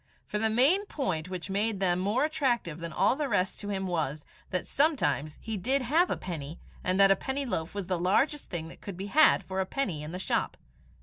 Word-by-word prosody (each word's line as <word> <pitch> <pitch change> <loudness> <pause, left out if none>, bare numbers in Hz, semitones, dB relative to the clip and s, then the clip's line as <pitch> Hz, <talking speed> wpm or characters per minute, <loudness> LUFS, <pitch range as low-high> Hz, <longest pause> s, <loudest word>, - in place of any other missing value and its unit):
For 210 - -3
the 220 +1 +2
main 290 - +4
point 185 - -2
which 185 +1 -5
made 205 +1 0
them 180 -2 +2
more 210 +9 +1
attractive 250 - 0
than 170 0 -5
all 195 +9 +3
the 290 -1 -2
rest 190 -3 0
to 205 - -5
him 190 -1 -2
was, 155 -5 -2 0.2
that 185 - -1
sometimes 155 - +1
he 220 -2 -4
did 260 +8 +1
have 320 +9 +3
a - - -1
penny, 160 -3 -6 0.2
and 185 +1 +1
that 195 0 +7
a - - +6
penny 275 +4 -3
loaf 180 -7 -3
was 200 -2 -3
the 180 -1 -1
largest 270 - +1
thing 165 -2 -4
that - - -14
could 195 -4 -7
be 195 - -4
had 310 +2 +6
for 190 0 -4
a - - -1
penny 190 - -2
in 150 +1 -6
the 180 - -4
shop. 185 - -1
195 Hz, 230 wpm, -29 LUFS, 175-265 Hz, 0.2 s, that